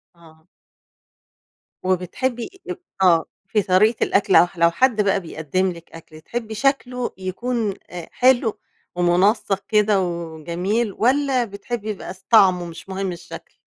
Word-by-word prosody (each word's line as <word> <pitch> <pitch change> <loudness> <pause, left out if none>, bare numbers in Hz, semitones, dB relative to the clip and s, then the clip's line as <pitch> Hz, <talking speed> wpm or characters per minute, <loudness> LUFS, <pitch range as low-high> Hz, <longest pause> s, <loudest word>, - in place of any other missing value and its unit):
آه. 160 -1 -20 1.4
وبتحبي 185 +7 -1 0.2
آآ، - - -3 0.3
آه، 170 -3 +5 0.2
في 210 +1 +1
طريقة 205 +5 +3
الأكل 195 -1 +2
أو 175 - +7
لو 170 0 +4
حد 230 +3 +2
بقى 200 -1 +2
بيقدم 175 +2 -2
لك 170 -1 -13
أكل 155 -1 -13
تحبي 220 +4 -5
شكله 250 -1 0
يكون 215 +4 -2 0.2
أ 175 -2 -8
حلو 240 -4 +2 0.4
ومنسق 190 +3 +2
كده 210 -2 +3
وجميل، 175 +5 -2
والَّا 260 +1 +2
بتحبي 215 +1 -6
يبقى 200 -3 -5
س 190 0 -22
طعمه 185 -5 +5
مش 170 +3 -10
مهم 190 0 -3
الشكل؟ 170 -1 -10
195 Hz, 130 wpm, -21 LUFS, 175-230 Hz, 1.4 s, أو